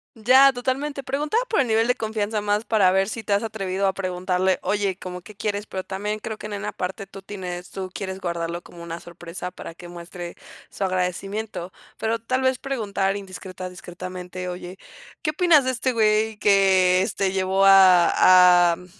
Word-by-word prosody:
Ya, 260 +5 +6
totalmente. 270 +3 -2
Preguntaba 290 - -1
por 450 - +1
el 275 - +3
nivel 225 +1 +2
de 250 - +2
confianza 215 -2 -2
más 205 +1 -1
para 205 -6 +3
ver 195 +1 +2
si 225 0 -5
te 205 - -1
has 200 - +2
atrevido 195 -3 -2
a 190 - +1
preguntarle: 185 0 -1
"Oye, 205 -2 0
¿cómo 180 -1 -7
que 195 +5 -13
quieres?". 205 0 -3
Pero 190 -3 -5
también 210 +3 -4
creo 220 0 -6
que - - -10
en 210 - -6
una 200 - -4
parte 190 +2 -5
tú 195 0 -12
tienes 180 -3 -7
tú 190 -1 -5
quieres 190 0 -5
guardarlo 170 -1 -3
como 170 -1 -13
una 170 0 -6
sorpresa 175 +1 -8
para 165 - -10
que 175 +1 -12
muestre 175 0 -8 0.3
su - - -5
agradecimiento. 185 +1 -3 0.3
Pero 225 +1 -1
tal 255 +3 -1
vez 260 -1 +1
preguntar 200 -7 -1
indiscreta 185 -2 -8
discretamente: 180 0 -7
"Oye, 180 +1 -7 0.5
¿qué 305 - +1
opinas 310 -4 +4
de 260 - +1
este 255 0 -1
güey 215 -1 +2
que, 190 -3 +4
este, 195 -1 -1
llevó 190 0 +1
a 180 -2 +6
a, - - -2
mm, 180 - -14
195 Hz, 185 wpm, -23 LUFS, 180-220 Hz, 0.5 s, Ya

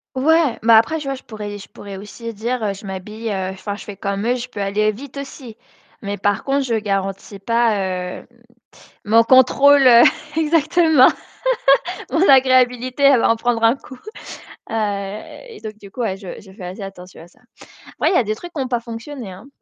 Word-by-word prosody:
Ouais, 300 -1 +2
mais 230 +1 +4
après, 230 +9 +4
je 300 - -8
vois, 275 0 -2
je 260 - -13
pourrais 210 -2 -7
je 200 - -12
pourrais 200 -1 -10
aussi 230 +4 -8
dire, 225 0 -2
je 200 +2 -12
m'habille, 210 +4 -5
enfin, 190 +1 -4
je - - -10
fais 205 -2 -9
comme 200 +2 -3
eux, 245 - +2
je 250 0 -5
peux 230 -5 -9
aller 210 +2 +1
vite 270 +5 -11
aussi, 265 -4 -9 0.5
mais 200 0 -4
par 205 0 0
contre, 275 0 0
je 235 - -1
garantis 195 -1 -3
pas, 195 -5 0
heu, - - -18 0.8
mon 225 +2 +5
contrôle 270 +3 +5 0.5
exactement. 320 -2 +4 1.1
Mon 335 +4 +2
agréabilité, 255 0 +3
elle 275 -4 +6
va - - +2
en 230 - +2
prendre 230 -1 -1
un 230 +4 +4
coup. 260 - -13 0.7
Heu, - - -4 0.8
et 450 - -12
donc 215 -1 -7
du 200 -2 -13
coup, 250 - -9 0.2
je 195 -2 -9
je 190 -2 -16
fais 190 -1 -11
assez 180 +4 -7
attention 185 -3 -10
à 170 - -15
ça. - - -27 0.6
Ouais, - - +2
il - - +1
y - - +5
a 250 - +2
des 215 +1 -2
trucs 350 +9 -11
qui 290 - -3
ont 260 - -2
pas 245 -2 -1
fonctionné, 235 -1 -8
hein 190 +8 -12
230 Hz, 195 wpm, -19 LUFS, 200-260 Hz, 1.1 s, elle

